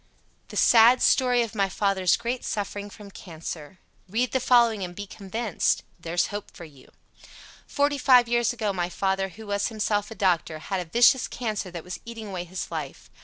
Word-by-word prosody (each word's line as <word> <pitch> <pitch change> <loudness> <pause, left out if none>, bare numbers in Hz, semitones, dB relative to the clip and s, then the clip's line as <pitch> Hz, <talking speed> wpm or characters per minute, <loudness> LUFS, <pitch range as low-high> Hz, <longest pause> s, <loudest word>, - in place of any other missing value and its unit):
] - - -39
THE - - -7
SAD 240 +2 +6
STORY 250 -2 +3
OF 225 - -6
MY 195 -1 0
FATHER'S 190 -2 +1
GREAT 240 +1 -3
SUFFERING 205 0 -4
FROM 205 0 -13
CANCER 165 -2 -8 0.3
Read 235 +5 0
the 260 - +1
following 235 -4 +3
and 175 -1 -6
be 205 - -6
convinced. 200 +1 -2 0.2
There's 170 +1 0
hope 205 0 -5
for 170 - -11
you. 140 -5 -17 0.8
Forty 285 0 0
five 250 -2 +5
years 240 0 +2
ago 220 -4 -2
my 175 -2 -2
father, 195 +1 -1
who 215 +5 -12
was 200 0 -1
himself 210 -2 -1
a 225 - -9
doctor, 175 -5 0
had 190 +4 -4
a 175 -2 -6
vicious 240 +5 +4
cancer 215 -6 -4
that 170 -2 -8
was 180 - -7
eating 225 -2 -8
away 180 -2 -5
his 180 +1 -6
life. 155 -5 -7
205 Hz, 190 wpm, -25 LUFS, 180-235 Hz, 0.8 s, SAD